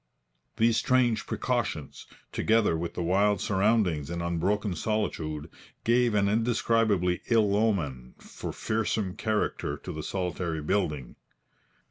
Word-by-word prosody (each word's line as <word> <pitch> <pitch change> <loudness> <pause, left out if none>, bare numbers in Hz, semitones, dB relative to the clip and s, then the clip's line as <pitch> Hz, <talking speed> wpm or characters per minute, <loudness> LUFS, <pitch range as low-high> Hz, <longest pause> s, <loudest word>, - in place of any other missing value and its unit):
These 115 0 +3
strange 125 -3 +2
precautions, - - -2 0.2
together 110 -6 +2
with 85 +1 -4
the 90 - -2
wild 100 +4 +2
surroundings 95 -7 +1
and 85 0 -3
unbroken 90 +4 0
solitude, 80 -7 -2 0.4
gave 120 -1 +3
an 100 -1 +3
indescribably 110 -4 +2
ill 110 -4 +3
omen 80 - -1
and - - -7
fearsome 110 -3 -1
character 110 -1 -1
to - - -7
the - - -5
solitary 90 -4 -3
building. 75 -8 -1
100 Hz, 115 wpm, -28 LUFS, 85-110 Hz, 0.4 s, These